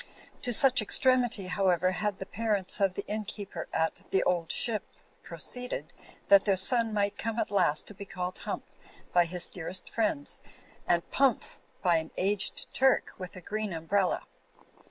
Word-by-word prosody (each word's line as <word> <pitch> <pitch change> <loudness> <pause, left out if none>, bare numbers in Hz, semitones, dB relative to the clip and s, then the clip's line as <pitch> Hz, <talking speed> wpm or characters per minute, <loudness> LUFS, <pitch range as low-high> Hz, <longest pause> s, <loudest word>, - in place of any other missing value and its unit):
To 245 - -2
such 265 +3 +5
extremity, 250 -6 +2
however, 185 -1 +1
had 210 0 -2
the 190 - -6
parents 205 -3 +1
of 195 -2 +2
the - - -5
inn 215 +1 -3
keeper 205 -1 -6
at 160 0 -1
"The 190 - +2
Old 170 -2 0
Ship" 220 -3 +2 0.4
proceeded, 250 0 -4 0.3
that 200 -1 +7
their 195 -2 +2
son 230 +4 +4
might 205 -1 -1
come 225 +1 -3
at 230 - -1
last 155 -7 +2
to* - - -9
be 200 0 -9
called 180 -1 -5
"Hump" - - -5 0.5
by 175 -1 +5
his 175 +1 +2
dear 165 -3 -6
est 185 0 -1
friends, 230 +6 0 0.5
and 170 -1 +1
"Pumph" 270 -4 +1 0.2
by 175 -3 +4
an 160 0 -4
aged 195 +1 +1
Turk 265 0 +2
with 185 -1 -8
a 185 - -9
green 210 +1 -4
umbrella. 180 +4 0
200 Hz, 170 wpm, -29 LUFS, 180-220 Hz, 0.5 s, that